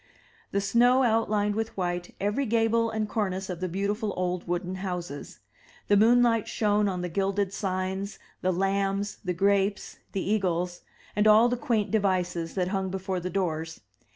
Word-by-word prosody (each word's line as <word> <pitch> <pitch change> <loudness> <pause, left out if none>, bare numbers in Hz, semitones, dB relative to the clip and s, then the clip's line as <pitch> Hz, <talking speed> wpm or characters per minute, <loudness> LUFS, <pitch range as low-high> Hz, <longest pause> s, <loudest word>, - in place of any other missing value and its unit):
The 200 - 0
snow 245 +6 +4
outlined 215 -3 +2
with 225 0 -3
white 175 -1 -3
every 210 +7 0
gable 230 0 +2
and 220 -1 -2
cornice 190 -3 -2
of 175 - -5
the 185 0 -2
beautiful 205 +4 -2
old 180 -1 -2
wooden 175 +1 -2
houses; 180 -6 -5 0.5
the 205 - +6
moonlight 230 +1 +4
shone 210 -1 +1
on 180 -2 -3
the 180 - -2
gilded 195 +2 -1
signs, 190 +1 -3 0.2
the 185 - +1
lambs, 195 +2 0
the 180 -2 -2
gi^apes, 200 +2 +1 0.2
the 195 - -2
eagles, 180 -4 0 0.3
and 210 +1 +3
all 220 +3 +7
the 245 - +1
quaint 230 -4 0
devices 180 -5 0
that 180 -2 0
hung 190 -1 -1
before 190 0 -3
the 180 +1 -4
doors. 165 -5 -2
195 Hz, 160 wpm, -27 LUFS, 180-215 Hz, 0.5 s, all